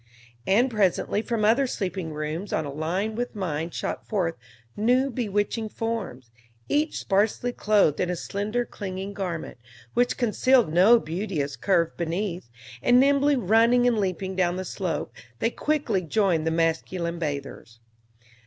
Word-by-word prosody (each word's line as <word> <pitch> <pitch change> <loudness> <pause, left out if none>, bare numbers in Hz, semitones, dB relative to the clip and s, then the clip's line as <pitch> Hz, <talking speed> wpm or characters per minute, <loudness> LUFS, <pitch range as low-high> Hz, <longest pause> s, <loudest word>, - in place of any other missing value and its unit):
And 240 +7 +3
presently 205 -1 +1
from 225 -2 -1
other 250 +5 +4
sleeping 185 -7 -3
rooms 155 +6 -4
on 160 - 0
a 140 - -6
line 180 +8 -2
with 240 +1 -4
mine 165 -5 -2
shot - - -4
forth 185 -6 0 0.4
new 250 +5 +2
bewitching 215 -1 -1
forms, 200 - -4 0.4
each 300 +2 0
sparsely 210 +5 +1
clothed 205 -10 +2
in 180 - 0
a 180 - -1
slender 210 +7 -2
clinging 195 -2 -6
garment, 175 -9 -5 0.3
which 245 0 +1
concealed 240 -4 +3
no 205 +8 +6
beauteous 160 -6 -3
curve 170 -4 +1
beneath; 175 - -3 0.3
and 245 +1 +5
nimbly 280 +1 +4
running 230 +2 +4
and 240 -3 +3
leaping 190 -1 -2
down 180 -1 +1
the 185 0 -4
slope, 180 -2 -3 0.2
they 230 - 0
quickly 290 -11 0
joined 175 -2 +1
the - - +2
masculine 170 +1 -1
bathers. 140 -6 -5
195 Hz, 145 wpm, -25 LUFS, 170-230 Hz, 0.4 s, no